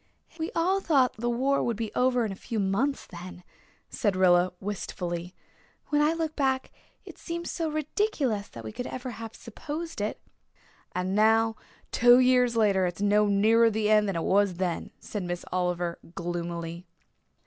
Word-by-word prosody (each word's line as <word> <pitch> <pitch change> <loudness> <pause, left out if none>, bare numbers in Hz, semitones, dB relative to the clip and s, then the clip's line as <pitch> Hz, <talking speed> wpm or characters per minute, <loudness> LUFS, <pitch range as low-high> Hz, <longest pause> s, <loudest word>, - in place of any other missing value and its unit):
"We 320 - -2
all 370 +4 +2
thought 275 -8 +3
the 240 +2 -1
war 265 +4 +1
would 235 -3 -1
be 225 -1 -4
over 250 -2 +2
in 210 - -3
a - - -5
few 220 +3 -4
months 205 +9 0
then," 180 0 -10 0.4
said 205 -5 -1
Rilla 180 -1 +4
wistfully. 180 -3 -4 0.5
"When 295 0 +3
I 300 +2 +3
look 320 -2 -3
back 265 -2 0 0.3
it - - -12
seems 340 0 -4
so 330 -2 -2
ridiculous 300 - -1
that 115 - -10
we 110 - -7
ever 250 +1 -5
could - - -8
have 225 0 -8
supposed 305 +4 -6
it." 210 - -2 0.8
"And 180 +1 -1
now, 220 +2 +4 0.4
two 245 +1 +6
years 250 -1 +4
later, 200 -4 +3
it 175 - -4
is 200 - -4
no 210 +1 +4
nearer 220 +3 +4
the 215 -1 0
end 210 -1 +4
than 195 - -2
it 165 - -1
was 200 -2 +2
then," 175 -1 -2
said 210 - -5
Miss 175 -1 -4
Oliver 180 -1 -1 0.2
gloomily. 170 0 -4
215 Hz, 170 wpm, -27 LUFS, 185-255 Hz, 0.8 s, two